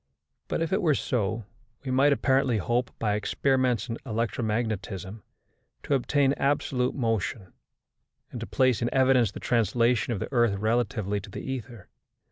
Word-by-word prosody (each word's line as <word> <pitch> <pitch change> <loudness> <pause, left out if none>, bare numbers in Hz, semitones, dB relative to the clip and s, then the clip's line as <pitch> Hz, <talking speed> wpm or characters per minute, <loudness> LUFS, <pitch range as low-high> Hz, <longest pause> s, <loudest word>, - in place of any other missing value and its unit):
But - - -1
if 165 - -2
it 200 - +2
were 155 -6 +3
so, 110 -3 -1 0.4
we 130 - -2
might 135 +3 +4
apparently 130 -3 +2
hope, 120 +4 0
by 105 -2 0
experiments 125 +2 +1
in 115 - -4
electromagnetism, 110 -4 -2 0.6
to - - -1
obtain 140 +1 +2
absolute 130 -2 0
motion, 110 -5 -2 0.8
and - - -6
to - - -5
place 125 +3 +2
in 120 - 0
evidence 130 -5 +3
the - - -8
translation 120 +1 +1
of 110 - -2
the - - -5
earth 120 -5 +3
relatively 110 -1 0
to 100 - -11
the - - -7
ether. 125 -5 -6
120 Hz, 150 wpm, -27 LUFS, 110-130 Hz, 0.8 s, might